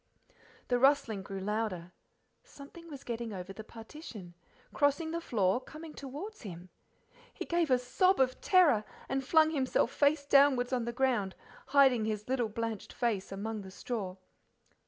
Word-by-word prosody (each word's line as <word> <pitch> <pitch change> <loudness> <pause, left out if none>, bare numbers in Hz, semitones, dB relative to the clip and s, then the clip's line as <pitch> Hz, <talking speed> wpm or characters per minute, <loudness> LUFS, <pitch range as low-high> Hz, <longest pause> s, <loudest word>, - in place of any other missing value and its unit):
The 245 -1 +2
rustling 270 -6 +3
grew 195 0 -6
louder, 200 -4 -2 0.5
something 335 - -13
was 285 -3 -9
getting 235 -2 -4
over 185 0 -6
the 220 - -8
partition, 225 - -10 0.4
crossing 295 +3 +1
the 335 0 -2
floor, 205 - +1
coming 310 +3 -10
towards 300 +12 -8
him. 180 -4 -9 0.6
He - - -6
gave 340 -2 +1
a 255 - +5
sob 365 +10 +2
of 255 -1 +1
terror 325 - +5 0.2
and 270 0 -1
flung 315 +3 +4
himself 260 -5 +1
face 285 0 +2
downwards 275 -3 +4
on 245 -2 0
the 235 - -2
ground, 235 -6 0 0.3
hiding 265 -5 +5
his 210 -1 -3
little 245 -3 0
blanched 225 -1 -4
face 220 -7 -1
among 210 +2 -4
the 190 - -10
straw. 190 -2 -4
245 Hz, 155 wpm, -31 LUFS, 210-285 Hz, 0.6 s, a